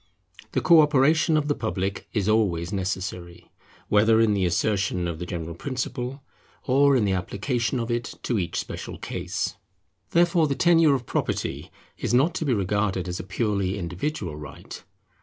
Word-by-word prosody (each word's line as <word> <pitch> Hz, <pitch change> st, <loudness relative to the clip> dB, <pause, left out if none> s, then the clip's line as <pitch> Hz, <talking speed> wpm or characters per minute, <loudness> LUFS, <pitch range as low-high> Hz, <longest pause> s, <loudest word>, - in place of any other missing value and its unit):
The -, -, +1 dB
co 170 Hz, -2 st, +7 dB
operation 155 Hz, +2 st, +3 dB
of 150 Hz, -1 st, 0 dB
the 145 Hz, -, +2 dB
public 100 Hz, -5 st, -3 dB
is 105 Hz, -3 st, -1 dB
always 95 Hz, -6 st, +1 dB
necessary, 95 Hz, -2 st, -4 dB, 0.4 s
whether 110 Hz, +2 st, +4 dB
in 110 Hz, -2 st, +4 dB
the 95 Hz, -3 st, +1 dB
assertion 95 Hz, 0 st, 0 dB
of 85 Hz, -2 st, -4 dB
the 90 Hz, -, -5 dB
general 85 Hz, -2 st, -5 dB
principle 130 Hz, -, -4 dB, 0.4 s
or 140 Hz, +1 st, +4 dB
in 115 Hz, -5 st, +2 dB
the 100 Hz, -, +1 dB
application 115 Hz, +7 st, -1 dB
of 115 Hz, 0 st, -3 dB
it 120 Hz, 0 st, -3 dB
to 120 Hz, -4 st, 0 dB
each 85 Hz, -, -3 dB
special -, -, -6 dB
case. -, -, -4 dB, 0.5 s
Therefore 170 Hz, -1 st, +3 dB
the 140 Hz, -, -1 dB
tenure 165 Hz, -2 st, +5 dB
of 125 Hz, -3 st, -4 dB
property -, -, -2 dB, 0.3 s
is -, -, 0 dB
not 145 Hz, +7 st, +3 dB
to 160 Hz, -, -3 dB
be 135 Hz, -, +2 dB
regarded 100 Hz, -1 st, 0 dB
as 90 Hz, 0 st, -4 dB
a -, -, -5 dB
purely 100 Hz, -1 st, -1 dB
individual 90 Hz, -, -4 dB
right. 75 Hz, -2 st, -10 dB
105 Hz, 165 wpm, -25 LUFS, 95-135 Hz, 0.5 s, co